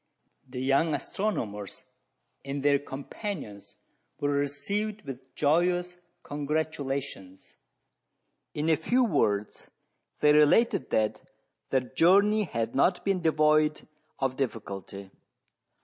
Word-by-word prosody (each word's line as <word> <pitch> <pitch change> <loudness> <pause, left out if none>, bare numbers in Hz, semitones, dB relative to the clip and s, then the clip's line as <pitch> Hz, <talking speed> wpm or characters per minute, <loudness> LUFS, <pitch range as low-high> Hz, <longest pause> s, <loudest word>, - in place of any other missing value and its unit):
The 125 0 -6
young 140 +4 +2
astronomers 110 - -4 0.6
and 140 0 -4
their 140 -1 +4
companions 140 - -7 0.4
were 145 - 0
received 195 +10 -2
with 130 -1 -10
joyous 175 +4 +1 0.3
congratulations. 140 - -4 1.0
In 150 +1 -1
a - - +5
few 245 - +1
words 105 - 0 0.5
they 150 0 +5
related 150 - +4
that 110 -1 0 0.5
their 130 - +2
journey 200 +11 +3
had 115 -8 -3
not 175 +7 +2
been 195 -2 +1
devoid 155 -1 +2 0.3
of 135 -1 -1
difficulty. 100 -6 -5
145 Hz, 100 wpm, -28 LUFS, 130-175 Hz, 1.0 s, a